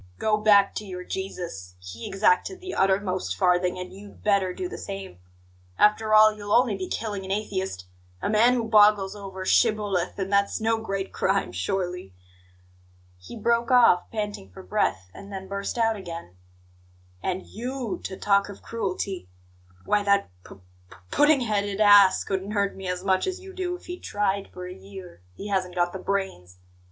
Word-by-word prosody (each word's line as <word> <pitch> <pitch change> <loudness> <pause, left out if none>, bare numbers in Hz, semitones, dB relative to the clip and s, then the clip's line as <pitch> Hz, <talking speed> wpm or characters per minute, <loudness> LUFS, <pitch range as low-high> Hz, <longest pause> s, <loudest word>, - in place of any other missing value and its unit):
Go 215 - +2
back 205 -2 +5
to - - -4
your 180 -3 -7
Jesus; 170 - -6
he 90 +6 -9
exacted 195 - +1
the 370 0 -7
uttermost 190 - 0
farthing, 180 - +2
and 180 0 -7
you'd 200 +1 -13
better 200 -3 +2
do 365 - -4
the - - -8
same. 195 - -7 0.6
After 215 +1 +4
all, 215 0 +7
you'll 205 -1 -8
only 245 -4 +4
be 190 -1 -5
killing 205 -3 -4
an 190 - -8
atheist 190 - -3 0.3
a - - -2
man 225 +4 +4
who 230 -2 -1
boggles 210 -3 +5
over 190 -2 -7
'shibboleth'; 205 -5 +1
and 195 0 -3
that's 200 0 +2
no 225 0 +1
great 195 -3 -4
crime, 195 +1 0
surely!" 180 - -3 1.0
He 90 - -11
broke 235 +2 +1
off, 240 -8 +5
panting 210 - -4
for 95 - -12
breath, 90 0 -1
and 200 0 -11
then 190 -1 -6
burst 200 +4 -4
out 225 -1 +2
again: 170 - -8 0.9
"And 185 0 -3
YOU 245 -1 -5
to 190 - -5
talk 200 0 +2
of 200 - -11
cruelty! 195 - -4 0.6
Why, 210 - +2
that 200 - +2
p - - -12 0.3
p - - -14 0.2
pudding 295 -2 +4
headed 205 -3 -1
ass 205 -2 +7
couldn't 195 +1 -3
hurt 200 -1 0
me 190 -1 -7
as 180 0 -3
much 190 - +1
as 375 0 -3
you 380 0 -11
do 360 -1 -3
if 360 - -14
he 355 0 -7
tried 200 -1 -1
for 180 0 -8
a 180 - -7
year; 190 - -12
he 205 - -7
hasn't 185 -2 -1
got 175 0 +1
the 190 - -5
brains. 185 - -3
200 Hz, 175 wpm, -25 LUFS, 185-215 Hz, 1.0 s, all